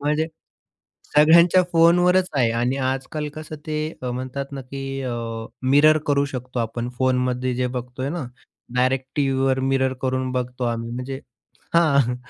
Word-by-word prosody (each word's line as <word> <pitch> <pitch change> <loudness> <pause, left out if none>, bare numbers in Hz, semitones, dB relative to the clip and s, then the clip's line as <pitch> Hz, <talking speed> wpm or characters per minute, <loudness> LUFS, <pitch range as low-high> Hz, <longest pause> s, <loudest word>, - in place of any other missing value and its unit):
म्हणजे 150 +2 0 0.9
सगळ्यांच्या 170 +4 +7
फोनवरच 180 +2 +4
आहे. 120 -4 +3
आणि 120 +3 0
आजकाल 140 +3 -4
कसं 155 0 -7
ते 155 -1 -2 0.3
म्हणतात 130 +2 -4
ना 140 - -5
की 135 0 -5
अ, 130 -2 -3 0.5
मिरर 145 +4 +5
करू 140 -1 +2
शकतो 125 0 -5
आपण 115 +1 -3
फोनमध्ये 125 -1 +1
जे 125 +1 0
बघतोय 125 +2 -5
ना, 170 -3 -3 0.5
डायरेक्ट 130 +1 +1
टीव्हीवर 135 -2 +1
मिरर 130 0 +1
करून 130 0 -1
बघतो 125 0 -3
आम्ही. 115 -1 -2
म्हणजे 125 +3 -5 0.5
हां. 140 -7 +4
135 Hz, 135 wpm, -22 LUFS, 125-150 Hz, 0.9 s, सगळ्यांच्या